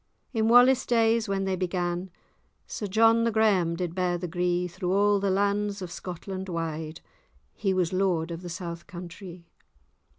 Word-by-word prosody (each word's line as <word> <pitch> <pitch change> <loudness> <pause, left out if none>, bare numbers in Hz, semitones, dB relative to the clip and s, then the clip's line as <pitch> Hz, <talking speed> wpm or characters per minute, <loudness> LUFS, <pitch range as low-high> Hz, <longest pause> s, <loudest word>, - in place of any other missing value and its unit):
In 220 -2 +1
Wallace 245 +2 +6
days, 230 -2 +2
when 195 -1 -1
they 190 -1 0
began, 180 0 -2 0.6
Sir 210 - -5
John 225 +3 +4
the 230 - +1
Graham[#] 200 -6 +2
did 175 -2 -3
bear 180 -1 0
the 175 +1 -4
gree 175 +1 0
Through 180 +1 -4
all 205 +1 +3
the 200 0 0
lands 200 +1 0
of 180 -2 -7
Scotland 185 +2 -6
wide: 160 -2 -4 0.5
He 195 - -1
was 185 -2 0
lord 180 -3 0
of 165 0 -6
the 180 - -7
south 170 -1 -6
countrie. 175 0 -10
185 Hz, 165 wpm, -27 LUFS, 175-205 Hz, 0.6 s, Wallace